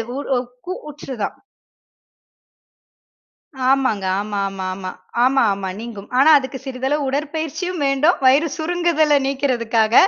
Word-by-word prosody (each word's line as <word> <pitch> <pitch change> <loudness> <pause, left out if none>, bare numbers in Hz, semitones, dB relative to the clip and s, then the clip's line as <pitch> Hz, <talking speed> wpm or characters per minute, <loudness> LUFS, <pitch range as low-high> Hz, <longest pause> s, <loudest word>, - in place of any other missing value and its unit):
உ - - -4 0.2
உ - - +2 0.3
கு 365 - -3
கூற்றுதான். 275 -7 -5 2.3
ஆமாங்க 260 -7 +2 0.2
ஆமாமாமா. 195 -2 -3 0.3
ஆமாமா 210 -8 +2
நீங்கும். 220 -3 -8
ஆனா 280 +4 +6
அதுக்கு 265 0 -6
சிறிதளவு 265 +3 -1
உடற்பயிற்சியும் 315 +4 -3
வேண்டும் 275 +5 +2
வயிறு 275 +5 +5
சுருங்குதல 315 -3 +2
நீக்குறதுக்காக 235 -5 +1
270 Hz, 95 wpm, -20 LUFS, 220-300 Hz, 2.3 s, ஆனா